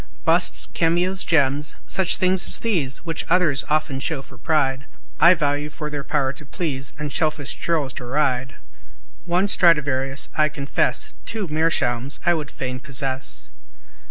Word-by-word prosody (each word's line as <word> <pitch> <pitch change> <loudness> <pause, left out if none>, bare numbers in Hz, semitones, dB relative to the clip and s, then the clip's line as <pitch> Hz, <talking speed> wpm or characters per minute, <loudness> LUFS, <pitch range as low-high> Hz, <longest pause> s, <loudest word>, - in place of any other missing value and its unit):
Busts, - - +3
cameos, 175 +3 +1
gems, 145 -2 +1
such 190 -3 +3
things 185 0 +2
as - - +2
these, 165 - -1
Which 165 -1 -2
others 165 -7 +3
often 150 -3 0
show 135 0 -2
for 130 - -15
pride, 135 -2 0 0.3
I 170 +2 +8
value 145 -1 -1
for 150 0 -6
their 145 -1 -4
power 140 -2 -1
to 150 - -11
please, 140 -3 -3
And 150 -1 -5
selfish 155 -3 0
churls 150 -6 -1
deride; 130 0 -1 0.7
One 180 +3 +1
Stradivarius, 145 -7 +3
I 155 0 +3
confess, 140 -2 -1
Two 215 -4 -2
Meerschaums, 145 -5 0
I 175 - +5
would 155 -3 -4
fain 130 -1 -5
possess. 135 -1 -4
150 Hz, 145 wpm, -22 LUFS, 135-165 Hz, 0.7 s, I